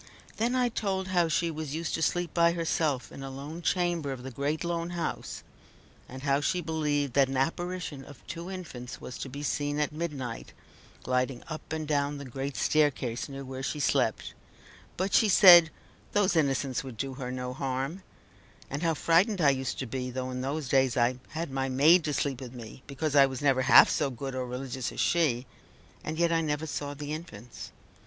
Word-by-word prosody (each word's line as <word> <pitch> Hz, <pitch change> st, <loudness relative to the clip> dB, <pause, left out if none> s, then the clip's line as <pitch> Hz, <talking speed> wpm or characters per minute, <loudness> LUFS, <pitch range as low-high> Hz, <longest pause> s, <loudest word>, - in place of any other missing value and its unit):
Then 235 Hz, +3 st, +1 dB
I 250 Hz, -1 st, +3 dB
told 195 Hz, -5 st, -2 dB
how 175 Hz, -2 st, +3 dB
she 165 Hz, +1 st, 0 dB
was 155 Hz, -2 st, -5 dB
used 165 Hz, +1 st, -3 dB
to 165 Hz, -, -1 dB
sleep 175 Hz, +1 st, 0 dB
by 170 Hz, 0 st, +4 dB
herself 160 Hz, -5 st, -1 dB
in -, -, -9 dB
a 135 Hz, -, -5 dB
lone 145 Hz, +5 st, -7 dB
chamber 175 Hz, -5 st, 0 dB
of 130 Hz, -2 st, -6 dB
the 130 Hz, -, -6 dB
great 140 Hz, +6 st, -2 dB
lone 170 Hz, 0 st, -2 dB
house; 165 Hz, -, -4 dB, 0.7 s
and 130 Hz, +1 st, -9 dB
how 140 Hz, 0 st, +2 dB
she 180 Hz, +5 st, 0 dB
believed 150 Hz, -5 st, -1 dB
that 140 Hz, 0 st, +4 dB
an 135 Hz, 0 st, -3 dB
apparition 165 Hz, 0 st, -2 dB
of 145 Hz, -, -14 dB
two 170 Hz, +2 st, -6 dB
infants 145 Hz, -10 st, -7 dB
was 125 Hz, -, -8 dB
to 135 Hz, -, -5 dB
be 140 Hz, +3 st, -7 dB
seen 145 Hz, 0 st, -1 dB
at 150 Hz, -, 0 dB
midnight 150 Hz, -7 st, -5 dB, 0.5 s
gliding 125 Hz, 0 st, -1 dB
up 155 Hz, -1 st, -7 dB
and 160 Hz, -1 st, -3 dB
down 145 Hz, -1 st, 0 dB
the 140 Hz, -, -7 dB
great 135 Hz, +2 st, -5 dB
staircase 145 Hz, -4 st, +1 dB
near 135 Hz, 0 st, -7 dB
where 130 Hz, 0 st, -6 dB
she 150 Hz, +2 st, -3 dB
slept, 140 Hz, -, 0 dB, 0.6 s
but 190 Hz, +2 st, -1 dB
she 220 Hz, -, +5 dB
said, 175 Hz, -4 st, +9 dB, 0.4 s
"those 205 Hz, -3 st, +3 dB
innocents 135 Hz, -4 st, +1 dB
would 130 Hz, -4 st, -9 dB
do 135 Hz, +2 st, -3 dB
her 130 Hz, -1 st, -5 dB
no 125 Hz, 0 st, -4 dB
harm;" 135 Hz, +7 st, -3 dB, 0.7 s
and 140 Hz, +2 st, -3 dB
how 165 Hz, -2 st, +1 dB
frightened 180 Hz, +7 st, +3 dB
I 145 Hz, -4 st, +5 dB
used 130 Hz, -1 st, -3 dB
to 130 Hz, -, -3 dB
be, 125 Hz, +1 st, -4 dB
though 130 Hz, 0 st, -4 dB
in 125 Hz, 0 st, -4 dB
those 140 Hz, +2 st, -3 dB
days 130 Hz, -1 st, +2 dB
I 125 Hz, +1 st, +2 dB
had 160 Hz, -1 st, -5 dB
my 135 Hz, 0 st, -1 dB
maid 155 Hz, +7 st, +5 dB
to 150 Hz, -, -1 dB
sleep 135 Hz, -2 st, -1 dB
with 125 Hz, -1 st, -8 dB
me, 115 Hz, +1 st, -10 dB
because 145 Hz, +1 st, -2 dB
I 140 Hz, -1 st, +7 dB
was 130 Hz, 0 st, -6 dB
never 135 Hz, -2 st, +3 dB
half -, -, +8 dB
so 145 Hz, -, +1 dB
good 135 Hz, +1 st, -6 dB
or 130 Hz, -1 st, -3 dB
religious 130 Hz, 0 st, -4 dB
as -, -, -8 dB
she 140 Hz, -7 st, +2 dB, 0.6 s
and 155 Hz, +1 st, -4 dB
yet 170 Hz, 0 st, +2 dB
I 165 Hz, 0 st, +2 dB
never 150 Hz, 0 st, -1 dB
saw 145 Hz, -1 st, -4 dB
the 145 Hz, +1 st, -5 dB
infants. 125 Hz, -, -8 dB
145 Hz, 200 wpm, -29 LUFS, 130-165 Hz, 0.7 s, said